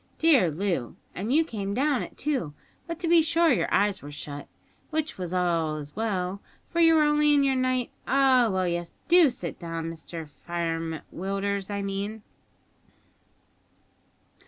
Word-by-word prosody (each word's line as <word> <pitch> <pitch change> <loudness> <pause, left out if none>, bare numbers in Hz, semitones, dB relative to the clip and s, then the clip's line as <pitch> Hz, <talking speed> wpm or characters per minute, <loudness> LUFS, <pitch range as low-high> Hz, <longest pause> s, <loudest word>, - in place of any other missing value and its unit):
Dear 280 - +5
Loo, 170 -6 -2 0.2
and 205 +7 -3
you 315 +4 +5
came 200 -7 -4
down 280 +1 +1
it, - - -8
too; 260 - -2 0.3
but, 335 -1 -4
to 345 - -1
be 335 0 +6
sure, 330 +1 +3
your - - 0
eyes 200 -1 +2
were 145 - -9
shut, 145 0 -6 0.4
which 310 -7 -2
was 180 -2 -4
as 160 -5 -1
well, 200 -3 -2 0.2
for 340 - -3
you 330 -1 +6
were 310 - +5
only 295 0 +4
in 285 - +4
your 270 -1 +3
night 255 -1 0 0.2
Ah, 260 -3 +4
well, 185 -1 0
yes, 175 -1 -3
do 340 -2 +6
sit 250 +1 -6
down 165 -1 -4
Mr 165 0 -8
Firem 165 0 -4
Willders, 195 +1 -2
I 200 -1 -3
mean." 200 +2 -4
200 Hz, 160 wpm, -27 LUFS, 170-280 Hz, 0.4 s, be